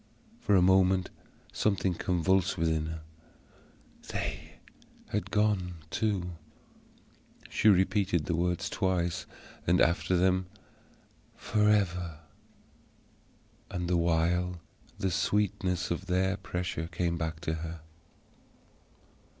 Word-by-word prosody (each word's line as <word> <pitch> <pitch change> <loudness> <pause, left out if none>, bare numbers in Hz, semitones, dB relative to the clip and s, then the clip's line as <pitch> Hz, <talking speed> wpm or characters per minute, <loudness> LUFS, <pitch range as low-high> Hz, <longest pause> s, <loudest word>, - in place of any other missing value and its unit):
For 100 - +2
a 90 - +5
moment 95 0 +4 0.4
something 95 -3 +1
convulsed 90 +2 +1
within 80 -1 0
her. 80 0 -6 1.1
They - - -4 0.6
had 105 - -2
gone 105 -4 +1 0.2
too. 100 -5 -1 1.2
She - - +2
repeated 95 -3 +3
the 85 - 0
words 90 +1 0
twice, 90 -2 -1 0.4
and, 90 +2 +4
after 85 +1 +3
them, 95 0 +2 0.9
"forever." 95 -6 +1 1.5
And 90 -1 -3
the 90 - +2
while 85 +1 +1 0.4
the 95 - -1
sweetness 90 -2 0
of 90 +2 -3
their 95 +1 +1
pressure 90 -4 -4
came 85 0 -1
back 80 -1 -3
to 80 -1 -1
her. 80 0 -6
90 Hz, 100 wpm, -30 LUFS, 85-95 Hz, 1.5 s, a